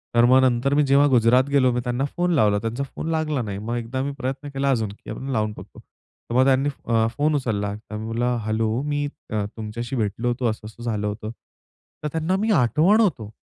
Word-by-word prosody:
तर 120 Hz, 0 st, +6 dB
मग 130 Hz, +2 st, +6 dB
नंतर 130 Hz, +2 st, +2 dB
मी 150 Hz, +1 st, +4 dB
जेव्हा 140 Hz, +1 st, +5 dB
गुजरातला 125 Hz, +2 st, +4 dB
गेलो, 130 Hz, -3 st, +4 dB
मी 125 Hz, -, 0 dB
त्यांना 125 Hz, +2 st, -1 dB
फोन 175 Hz, 0 st, +1 dB
लावला. 105 Hz, -8 st, +3 dB
त्यांचा 115 Hz, +5 st, -3 dB
फोन 160 Hz, +4 st, -6 dB
लागला 155 Hz, -4 st, 0 dB
नाही. 100 Hz, -4 st, -4 dB
मग 115 Hz, +3 st, -3 dB
एकदा 120 Hz, +3 st, -3 dB
मी 140 Hz, -, -2 dB
प्रयत्न 135 Hz, +2 st, -4 dB
केला 135 Hz, 0 st, 0 dB
अजून 110 Hz, -5 st, 0 dB
की 100 Hz, -, -13 dB
आपण 135 Hz, -, -6 dB
लावून 110 Hz, -3 st, 0 dB
बघू. -, -, -12 dB
तर 120 Hz, -, -12 dB
मग 130 Hz, +1 st, +5 dB
त्यांनी 135 Hz, +1 st, +3 dB, 0.2 s
अ, 115 Hz, -1 st, +2 dB
फोन 150 Hz, +1 st, +2 dB
उचलला 105 Hz, -6 st, -1 dB
तर 105 Hz, 0 st, -10 dB
म्हणला 115 Hz, +3 st, -1 dB
"हॅलो, 110 Hz, +2 st, 0 dB
मी 145 Hz, 0 st, -1 dB, 0.3 s
तुमच्याशी 110 Hz, +4 st, -4 dB
भेटलो 110 Hz, +1 st, -1 dB
होतो 120 Hz, +1 st, -1 dB
असं-असं 110 Hz, +2 st, -7 dB
झालं 105 Hz, -3 st, -1 dB
होतं." 105 Hz, +1 st, -5 dB, 0.7 s
तर 150 Hz, -, 0 dB
त्यांना 165 Hz, +3 st, 0 dB
मी 220 Hz, +1 st, +1 dB
आठवण 165 Hz, -, +4 dB
होतो. 140 Hz, -, 0 dB
125 Hz, 205 wpm, -23 LUFS, 110-140 Hz, 0.7 s, तर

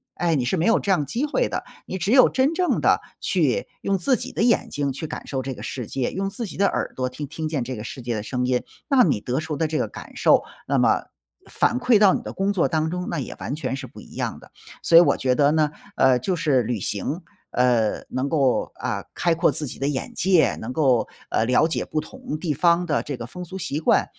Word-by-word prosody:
哎， 175 Hz, -2 st, +1 dB
你 125 Hz, -4 st, 0 dB
是 190 Hz, -, 0 dB
没 165 Hz, -, +1 dB
有 225 Hz, -, +4 dB
这 200 Hz, -, -5 dB
样 150 Hz, -6 st, +2 dB
机 240 Hz, -, -1 dB
会 405 Hz, +12 st, 0 dB
的， -, -, -3 dB, 0.2 s
你 190 Hz, -, -4 dB
只 195 Hz, +4 st, 0 dB
有 255 Hz, 0 st, +7 dB
真 270 Hz, +5 st, +2 dB
正 360 Hz, 0 st, +1 dB
地 -, -, +3 dB, 0.2 s
去 -, -, +1 dB
用 195 Hz, 0 st, +1 dB
自 255 Hz, +8 st, +2 dB
己 -, -, -5 dB
的 -, -, -3 dB
眼 235 Hz, 0 st, +3 dB
睛 140 Hz, -1 st, -1 dB
去 140 Hz, -, -5 dB
感 -, -, -7 dB
受 135 Hz, -2 st, -2 dB
这 135 Hz, 0 st, -4 dB
个 -, -, -10 dB
世 125 Hz, -3 st, -5 dB
界， 130 Hz, -2 st, -2 dB
用 195 Hz, +1 st, -2 dB
自 225 Hz, +3 st, -4 dB
己 -, -, -9 dB
的 200 Hz, -, +3 dB
耳 -, -, -2 dB
朵 130 Hz, 0 st, -1 dB
听 145 Hz, +3 st, -6 dB
听 160 Hz, +2 st, -4 dB
见 150 Hz, -5 st, -1 dB
这 130 Hz, +2 st, -5 dB
个 105 Hz, -, -6 dB
世 125 Hz, +3 st, -7 dB
界 120 Hz, -1 st, -2 dB
的 105 Hz, -, -3 dB
声 125 Hz, +2 st, -2 dB
音， 125 Hz, -1 st, +1 dB, 0.2 s
那 270 Hz, -4 st, +5 dB
你 145 Hz, -, +2 dB
得 125 Hz, +5 st, -1 dB
出 160 Hz, -1 st, -4 dB
的 160 Hz, +2 st, +1 dB
这 155 Hz, -, -2 dB
个 -, -, 0 dB
感 -, -, -11 dB
受， -, -, +4 dB, 0.2 s
那 -, -, +1 dB
么 -, -, +3 dB, 0.5 s
反 245 Hz, -, +1 dB
馈 245 Hz, -2 st, +4 dB
到 205 Hz, -3 st, +6 dB
你 -, -, -1 dB
的 -, -, -7 dB
工 195 Hz, +1 st, 0 dB
作 185 Hz, -4 st, +2 dB
当 160 Hz, -1 st, 0 dB
中， 180 Hz, 0 st, -3 dB
那 170 Hz, -, -2 dB
也 125 Hz, -, -6 dB
完 140 Hz, -, -3 dB
全 150 Hz, -, -3 dB
是 135 Hz, -, -7 dB
不 -, -, -13 dB
一 -, -, -15 dB
样 -, -, -3 dB
的。 -, -, -17 dB, 0.3 s
所 165 Hz, -, +6 dB
以 170 Hz, -, +11 dB
我 -, -, +3 dB
觉 130 Hz, -1 st, +1 dB
得 145 Hz, +2 st, +4 dB
呢， 155 Hz, -1 st, +2 dB, 0.2 s
呃， 130 Hz, -2 st, +4 dB
就 180 Hz, +9 st, -1 dB
是 145 Hz, -6 st, +2 dB
旅 120 Hz, +1 st, -2 dB
行， 140 Hz, -, -2 dB, 0.3 s
呃， 120 Hz, -4 st, +2 dB
能 130 Hz, +2 st, -2 dB
够， 140 Hz, -4 st, +1 dB
啊， -, -, -3 dB
开 170 Hz, -, +2 dB
阔 165 Hz, +2 st, +3 dB
自 150 Hz, -, -1 dB
己 130 Hz, -, -7 dB
的 140 Hz, -, 0 dB
眼 140 Hz, -3 st, -3 dB
界， 180 Hz, -3 st, +3 dB
能 120 Hz, +3 st, -6 dB
够， 130 Hz, -7 st, +2 dB, 0.2 s
呃， 110 Hz, -, +1 dB
了 125 Hz, +6 st, +4 dB
解 -, -, -1 dB
不 155 Hz, -, -2 dB
同 255 Hz, -11 st, -7 dB
地 155 Hz, -1 st, -2 dB
方 170 Hz, +4 st, +3 dB
的 150 Hz, -4 st, 0 dB
这 140 Hz, -, -5 dB
个 120 Hz, -, -7 dB
风 180 Hz, +8 st, -8 dB
俗 190 Hz, +3 st, -7 dB
习 170 Hz, -5 st, -3 dB
惯， -, -, +3 dB
155 Hz, 280 characters per minute, -23 LUFS, 130-185 Hz, 0.5 s, 以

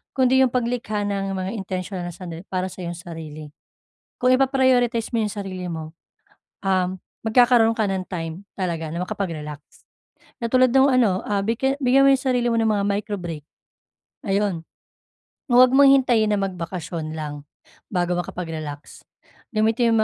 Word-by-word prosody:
kundi 260 Hz, -1 st, +4 dB
'yong 260 Hz, -, +4 dB
paglikha 235 Hz, -4 st, -1 dB
ng 195 Hz, -1 st, -2 dB
mga 185 Hz, +1 st, -3 dB
intensyonal 185 Hz, -3 st, -4 dB
na -, -, -8 dB
sanadali 175 Hz, 0 st, -8 dB
para 185 Hz, -1 st, -1 dB
sa 185 Hz, -, -9 dB
iyong 175 Hz, -1 st, -5 dB
sarili. 160 Hz, -3 st, -8 dB, 0.7 s
Kung 250 Hz, +1 st, +4 dB
ipa-prioritize 255 Hz, -3 st, +2 dB
mo -, -, +1 dB
'yong 210 Hz, -, -2 dB
sarili 190 Hz, -3 st, -5 dB
mo, 160 Hz, -1 st, -6 dB, 0.7 s
um, 185 Hz, -2 st, +2 dB, 0.4 s
magkakaroon 235 Hz, 0 st, +5 dB
ka 220 Hz, -, +1 dB
ng 190 Hz, -1 st, -2 dB
time 165 Hz, 0 st, -5 dB, 0.2 s
talaga 165 Hz, -4 st, -2 dB
na 170 Hz, -, -3 dB
makapag-relax. 155 Hz, -6 st, -5 dB, 0.8 s
Katulad 255 Hz, +2 st, +3 dB
nung 270 Hz, +1 st, +6 dB
ano, 220 Hz, -7 st, +3 dB
ah, 205 Hz, -1 st, 0 dB
bigya 265 Hz, +5 st, 0 dB
bigyan 260 Hz, +2 st, +5 dB
mo -, -, +7 dB
'yong 265 Hz, -, -1 dB
sarili 245 Hz, -2 st, +1 dB
mo 230 Hz, -, +1 dB
ng 225 Hz, -, +2 dB
mga 205 Hz, -2 st, +1 dB
microbreak, 200 Hz, -7 st, -3 dB, 0.8 s
ayun. 195 Hz, -4 st, 0 dB, 0.9 s
Huwag 250 Hz, +1 st, +7 dB
mong 275 Hz, +1 st, +6 dB
hintayin 245 Hz, -5 st, +4 dB
na 205 Hz, -, +1 dB
magbakasyon 170 Hz, -4 st, -4 dB
lang 145 Hz, -2 st, -6 dB, 0.4 s
bago 180 Hz, -1 st, 0 dB
makapag-relax. 160 Hz, -5 st, -7 dB, 0.5 s
Gamitin 225 Hz, +2 st, +2 dB
mo 220 Hz, -, +4 dB
200 Hz, 150 wpm, -23 LUFS, 175-240 Hz, 0.9 s, mo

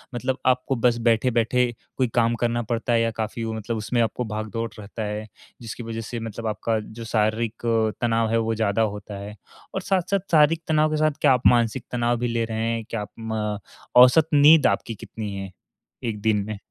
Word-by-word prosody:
मतलब 130 Hz, +2 st, -1 dB
आपको 130 Hz, +1 st, +2 dB
बस 120 Hz, 0 st, +2 dB
बैठे-बैठे 120 Hz, +1 st, +2 dB, 0.3 s
कोई 130 Hz, -2 st, +2 dB
काम 120 Hz, 0 st, +3 dB
करना 120 Hz, 0 st, +1 dB
पड़ता 115 Hz, +1 st, -1 dB
है 115 Hz, -, +3 dB
या 115 Hz, 0 st, +1 dB
काफ़ी 110 Hz, +1 st, -3 dB
वो 110 Hz, 0 st, -3 dB
मतलब 110 Hz, +1 st, -4 dB
उसमें 115 Hz, +3 st, 0 dB
आपको 120 Hz, +2 st, -1 dB
भाग-दौड़ 110 Hz, +1 st, -4 dB
रहता 105 Hz, +2 st, -6 dB
है, 105 Hz, +1 st, -4 dB, 0.3 s
जिसकी 115 Hz, +1 st, -7 dB
वजह 115 Hz, 0 st, -5 dB
से 115 Hz, +1 st, -5 dB
मतलब 115 Hz, 0 st, -5 dB
आपका 110 Hz, +1 st, -1 dB
जो 110 Hz, +2 st, -9 dB
शारीरिक 110 Hz, 0 st, 0 dB
तनाव 115 Hz, -1 st, +1 dB
है 115 Hz, -, +3 dB
वो 115 Hz, 0 st, -1 dB
ज़्यादा 110 Hz, 0 st, +1 dB
होता 105 Hz, -1 st, -3 dB
है? 105 Hz, +1 st, -8 dB, 0.4 s
और -, -, -1 dB
साथ-साथ 195 Hz, +1 st, 0 dB
शारीरिक 160 Hz, +1 st, +4 dB
तनाव 155 Hz, 0 st, +2 dB
के 155 Hz, -, 0 dB
साथ 155 Hz, 0 st, +3 dB
क्या 130 Hz, -, +6 dB
आप 125 Hz, -, +3 dB
मानसिक 120 Hz, 0 st, +2 dB
तनाव 120 Hz, 0 st, +1 dB
भी 120 Hz, -, 0 dB
ले 115 Hz, -1 st, 0 dB
रहे 110 Hz, 0 st, -3 dB
हैं? 115 Hz, -1 st, -2 dB
क्या 115 Hz, -2 st, -3 dB
आप 105 Hz, -, -8 dB
म 110 Hz, -2 st, -3 dB, 0.4 s
औसत 155 Hz, +5 st, +5 dB
नींद 150 Hz, +2 st, +7 dB
आपकी 105 Hz, +3 st, -1 dB
कितनी 105 Hz, -1 st, -7 dB
है 95 Hz, -1 st, -6 dB, 0.6 s
1 105 Hz, -2 st, -5 dB
दिन 105 Hz, -2 st, +1 dB
में? 110 Hz, -1 st, -4 dB
115 Hz, 200 wpm, -24 LUFS, 110-120 Hz, 0.6 s, नींद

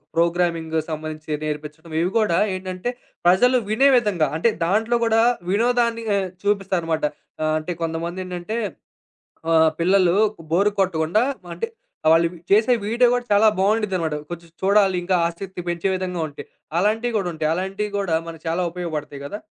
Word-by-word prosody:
Programming 170 Hz, -1 st, +1 dB
సంబంధించి 155 Hz, -1 st, -4 dB
నేర్పించటం 155 Hz, +2 st, -6 dB
ఇవి 175 Hz, -, +1 dB
కూడా 205 Hz, -6 st, +2 dB, 0.2 s
ఏంటంటే 185 Hz, +3 st, -4 dB, 0.4 s
ప్రజలు 245 Hz, +9 st, +5 dB
వినే 220 Hz, +6 st, +4 dB
విధంగా 200 Hz, -10 st, +1 dB
అంటే 200 Hz, +9 st, +3 dB, 0.2 s
దాంట్లో 220 Hz, +6 st, +2 dB
గూడా 225 Hz, 0 st, +3 dB, 0.3 s
వినోదాన్ని 235 Hz, +2 st, +1 dB
ఆహ్, 195 Hz, -1 st, 0 dB, 0.2 s
చూపిస్తారన్నమాట. 190 Hz, -5 st, 0 dB, 0.4 s
ఆహ్, 155 Hz, 0 st, +1 dB
అంటే 155 Hz, +3 st, -5 dB
కొంతమందేంటంటే 175 Hz, +4 st, -4 dB, 1.0 s
ఆహ్, 160 Hz, -1 st, +5 dB
పిల్లలు‌కు 190 Hz, +2 st, +3 dB
బోర్ 195 Hz, +5 st, +4 dB
కొట్టకుండా 175 Hz, +1 st, +1 dB, 0.2 s
మ -, -, -15 dB
అంటే 460 Hz, -, -2 dB, 0.4 s
ఆ! -, -, +6 dB
వాళ్ళు 165 Hz, +1 st, +5 dB, 0.2 s
చేసే 215 Hz, +5 st, +5 dB
వీడియో 235 Hz, +3 st, +3 dB
గూడా 245 Hz, 0 st, 0 dB
చాలా 205 Hz, +2 st, +5 dB
బావుండిద్దిదన్నమాట. 190 Hz, -6 st, +1 dB
కొంచెం 170 Hz, 0 st, -7 dB
చూడాలి. 195 Hz, -1 st, +4 dB
ఇంకా 185 Hz, +2 st, 0 dB
ఆసక్తి 180 Hz, +2 st, -6 dB
పెంచే 175 Hz, +2 st, -1 dB
విధంగా 185 Hz, -2 st, -3 dB
ఉంటాయి. 145 Hz, -, -10 dB, 0.3 s
అలాంటివి 220 Hz, +5 st, +1 dB
గూడా 195 Hz, -4 st, 0 dB
ఉంటాయి. 155 Hz, -1 st, -1 dB
అలాంటివి 195 Hz, +4 st, -3 dB
గూడా 195 Hz, -5 st, 0 dB
మనకు 165 Hz, -1 st, -8 dB
చాలా 170 Hz, +3 st, 0 dB
ఉపయోగపడతాయి 155 Hz, -5 st, -5 dB
గదా? 205 Hz, +9 st, -5 dB
185 Hz, 145 wpm, -22 LUFS, 165-210 Hz, 1.0 s, ఆ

